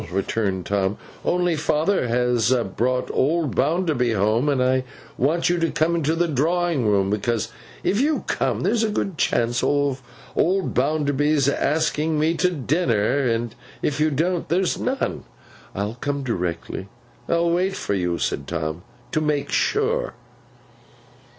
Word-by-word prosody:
returned 95 -1 -1
Tom. 100 +1 0 0.3
'Only 180 -1 +1
father 155 +1 +1
has 120 -1 +2 0.2
brought 125 +2 0
old 155 0 +1
Bounderby 150 -5 +1
home, 110 +7 +2
and 140 -2 +1
I 130 0 +2 0.3
want 155 +7 +1
you 175 0 +2
to 165 0 +1
come 160 +3 +1
into 160 -1 +1
the 175 +1 +1
drawing 160 -2 +1
room. 100 -1 +2
Because 115 +1 -1 0.3
if 205 +5 +2
you 300 +2 +1
come, - - -1
there's 230 -1 +1
a 220 - +1
good 195 -6 -2
chance 120 +1 +1
of 145 -2 +1 0.3
old 190 +1 +1
Bounderby's 145 0 +1
asking 155 +2 +1
me 155 +2 +2
to 180 +3 +3
dinner; 135 - +1
and 115 0 -1 0.3
if 150 0 0
you 155 +1 +3
don't, 170 +5 -1
there's 180 +2 +1
none.' 270 +1 -2 0.5
'I'll 105 +4 -3
come 140 -1 -2
directly.' 90 -4 -3 0.4
'I'll 170 0 +2
wait 185 +3 +1
for - - -2
you,' 90 -3 0
said 70 - -2
Tom, 80 0 -3 0.3
'to 155 - +1
make 150 -2 -1
sure. 445 +4 +1
145 Hz, 145 wpm, -23 LUFS, 115-170 Hz, 0.5 s, to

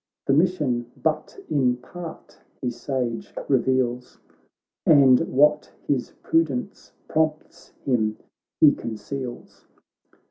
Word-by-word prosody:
The 135 - +2
mission 145 -8 +1
but 155 - -2
in 125 -4 +2
part 165 +6 -10 0.2
he 125 - -2
sage 120 -1 -4
reveals. 125 -1 0 0.7
And 135 -5 +6
what 150 +3 +3 0.2
his 135 -4 -1
prudence 165 +1 -1 0.2
prompts 155 -1 -2 0.2
him 110 -5 +1 0.4
he - - +7
conceals. 120 +3 -7
130 Hz, 95 wpm, -24 LUFS, 125-150 Hz, 0.7 s, he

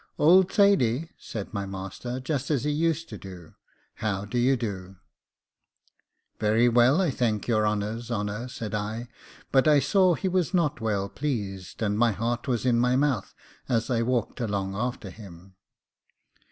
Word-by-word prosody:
'Old 180 +4 +5
Thady,' 165 - +3
said 105 -2 -7
my 100 -2 -3
master, 95 +6 -5
just 135 +1 -3
as 145 -5 +1
he 150 - 0
used 165 +2 0
to 105 - -8
do, 90 -3 -11 0.4
'how 105 -2 -2
do 115 +4 -2
you 130 +2 +3
do?' 95 -5 -5 1.4
'Very 110 +3 +3
well, 120 +6 +4
I 180 -6 +2
thank 115 -5 -1
your 110 -3 +2
honour's 105 +3 -2
honour,' 105 +1 -3
said 110 -4 -6
I; 110 +3 -3 0.4
but 135 +2 +4
I 150 -1 +6
saw 185 +5 +3
he 190 - -2
was 185 -1 0
not 160 -8 +1
well 100 -3 0
pleased, 100 -4 -4
and 105 0 0
my 115 -2 +4
heart 115 +5 -2
was 125 -2 -1
in 120 -2 +3
my 125 +1 +3
mouth 130 -7 0 0.3
as 115 +1 0
I 115 -1 +2
walked 120 0 -1
along 100 -3 -2
after 120 -3 -3
him. 95 -2 -13
115 Hz, 165 wpm, -26 LUFS, 105-135 Hz, 1.4 s, I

